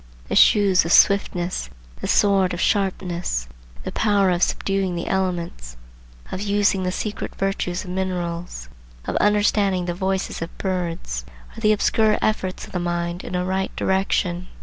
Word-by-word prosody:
The - - -1
shoes 200 -3 +5
of 165 - -3
swiftness, 180 - +3 0.3
the - - -5
sword 195 -3 +3
of - - -7
sharpness, 180 - -1 0.4
the - - -4
power 200 -3 +2
of 175 0 0
subduing 195 -2 0
the 170 - -3
elements, 170 - -3 0.5
of 185 - -4
using 205 -1 +2
the 185 0 -1
secret 210 +3 -4
virtues 195 -2 -2
of 180 - -7
minerals, 175 - -3 0.4
of - - -3
understanding 205 -3 +2
the 175 - -2
voices 190 0 -2
of 165 - -6
birds, 170 - -3 0.3
are - - -9
the 215 -1 +4
obscure 215 +1 +2
efforts 190 -4 -1
of - - -14
the 180 - -2
mind 175 0 -2
in - - -5
a 180 0 0
right 190 +1 -2
direction. 185 -2 0
185 Hz, 155 wpm, -22 LUFS, 175-195 Hz, 0.5 s, shoes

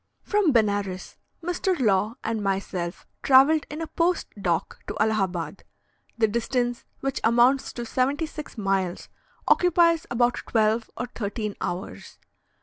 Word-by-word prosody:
From 410 -6 +2
Benares, 205 -5 0 0.3
Mr. 355 0 -1
Law 215 -1 +2
and 225 -1 -2
myself 190 -3 -3 0.2
travelled 280 +3 +5
in 300 +2 -6
a - - -1
post 340 +2 0
dock 175 -4 -2
to - - -5
Allahabad. 195 -6 -1 0.5
The 225 -1 +3
distance, 240 +2 -1 0.2
which 270 -1 -2
amounts 240 +4 +3
to 240 - -5
seventy 270 +7 0
six 305 -4 -9
miles, 195 -3 -1 0.4
occupies 340 -2 +4
about 245 0 +1
twelve 220 0 +1
or 245 - -2
thirteen 210 -3 -4
hours. 180 +3 -5
235 Hz, 130 wpm, -25 LUFS, 200-280 Hz, 0.5 s, travelled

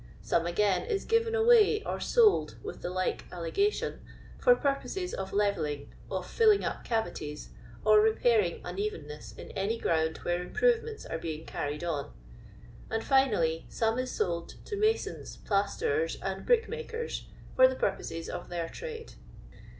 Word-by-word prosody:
Some, 170 0 +1
again, 190 +2 +2
is 420 -4 -1
given 455 0 +2
awaj 445 -2 +5
or - - -2
sold 450 -4 +3
(with 435 - -7
the - - -3
like 185 0 -1
allegation) 290 - -1 0.4
for - - +6
purposes 360 - -2
of 190 0 -4
levelling, 155 -9 -1 0.2
of - - -3
filling 435 -3 +4
up - - -3
cavities, 155 -10 -3 0.4
or 215 0 +7
repairing 220 -4 +2
nn 180 +2 -5
evennesses 150 -8 -5
in - - -9
any 205 +4 -1
ground 160 -5 0
where 175 0 0
improvements 455 - 0
are 165 - -4
being 160 -1 -5
carried 145 +3 -4
on; 155 -5 -2 0.8
and, 225 0 -1
finally, 210 - +2
some 225 +1 0
is 255 0 -2
sold 170 -7 -2
to 415 - -4
masons, 430 +2 -1
plasterers, 440 - 0
and - - -4
brickmakers, 470 0 -1 0.3
for 260 0 +8
the 260 - -2
pur 195 -6 +1
poses 165 -3 -6
of 175 - -6
their 170 -2 -3
trade. 465 -1 -7
220 Hz, 150 wpm, -30 LUFS, -, 0.8 s, for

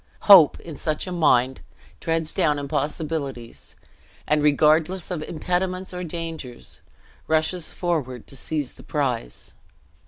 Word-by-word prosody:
Hope, 185 -8 +8
in 165 -3 -9
such 155 +1 -2
a 185 - -6
mind, 130 -7 +2 0.4
treads 165 -1 -2
down 150 -2 +2
impossibilities; 140 -3 -4 0.5
and, 150 0 +2
regardless 155 +5 +2
of 175 -4 -3
impediments 180 +4 -2
or 180 0 -4
dangers, 165 -7 -7 0.5
rushes 160 +2 +1
forward 145 - -3
to 135 - -10
seize 145 0 -3
the - - -15
prize. - - -3
155 Hz, 120 wpm, -23 LUFS, 145-170 Hz, 0.5 s, Hope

